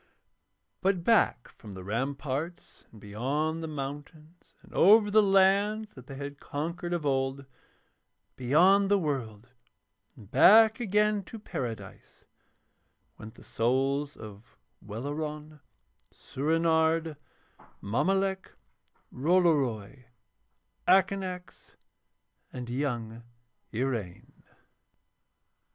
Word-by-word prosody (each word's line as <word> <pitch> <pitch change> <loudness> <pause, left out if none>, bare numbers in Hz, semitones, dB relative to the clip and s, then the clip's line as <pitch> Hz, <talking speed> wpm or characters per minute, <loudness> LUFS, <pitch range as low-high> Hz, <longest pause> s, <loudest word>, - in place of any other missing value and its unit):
But 185 -2 0
back 220 - +2
from 105 -3 -13
the 95 - -9
ramparts 135 - -4
and 110 - -15
beyond 140 +11 -2
the 160 - -4
mountains 150 +3 -9
and - - -18
over 210 +2 +5
the 215 +1 +6
lands 200 +2 +2
that 130 -1 -14
they 135 - -8
had 140 +1 -7
conquered 170 +4 -5
of 170 -3 -2
old, 135 0 -1 0.9
beyond 180 +10 +3
the 205 - +4
world 125 - -4 0.7
and 100 -2 -16
back 220 +2 +6
again 210 -2 +1
to 225 - -9
Paradise, 135 - -8 0.9
went 110 +1 -11
the - - -16
souls 135 +5 -1
of 105 +1 -13 0.3
Welleran, 150 +7 -6 0.5
Soorenard, 160 +2 0 0.6
Mommolek, 190 - -1 0.6
Rollory, 135 - +1 0.8
Akanax, 190 -1 0 0.8
and 125 -1 -7
young 120 -4 -3 0.5
Iraine. 115 -7 -4
150 Hz, 90 wpm, -28 LUFS, 125-185 Hz, 0.9 s, the